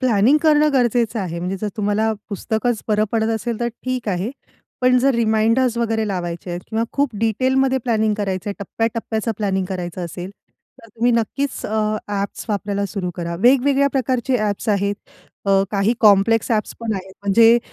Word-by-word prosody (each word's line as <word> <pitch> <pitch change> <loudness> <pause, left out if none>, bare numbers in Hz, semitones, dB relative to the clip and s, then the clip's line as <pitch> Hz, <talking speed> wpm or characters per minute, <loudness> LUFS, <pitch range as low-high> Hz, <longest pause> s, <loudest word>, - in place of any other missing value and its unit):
Planning 250 +3 +4
करणं 300 -1 +4
गरजेचं 240 -3 +1
आहे. 170 -3 -4
म्हणजे 180 +2 -2
जर 215 - -1
तुम्हाला 215 +1 +1 0.2
पुस्तकच 220 +3 -1
बरं 210 0 +3
पडत 220 -1 +1
असेल 230 +1 -3
तर 235 - +1
ठीक 255 -3 -3
आहे. 190 +3 -1 0.5
पण 250 0 +4
जर 270 +1 +3
रिमाइंडर्स 230 +2 +2
वगैरे 225 -2 0
लावायचे 175 -2 -4
आहेत 175 0 -4
किंवा 225 +1 0
खूप 280 -2 +1
डिटेलमध्ये 260 +4 +2
प्लॅनिंग 220 -3 +1
करायचंय, 200 -1 -2
टप्प्या-टप्प्याचं 225 +2 -2
प्लॅनिंग 195 -3 0
करायचं 180 -1 -4
असेल, 175 +2 -7 0.5
तर 230 - -16
तुम्ही 235 +3 +1
नक्कीच 265 +4 -1
अ, 215 0 0
ॲप्स 200 -1 -3
वापरायला 200 -1 -1
सुरु 190 -3 -4
करा. 170 -1 -3
वेगवेगळ्या 275 +4 +4
प्रकारचे 255 -1 0
ॲप्स 210 +1 -2
आहेत. 200 -1 +1 0.5
अ, 195 0 +4
काही 205 +3 +1
कॉम्प्लेक्स 215 +2 +4
ॲप्स 215 -2 0
पण 230 -1 -2
आहेत. 190 0 -7
म्हणजे 225 +4 +6
220 Hz, 160 wpm, -20 LUFS, 200-240 Hz, 0.5 s, म्हणजे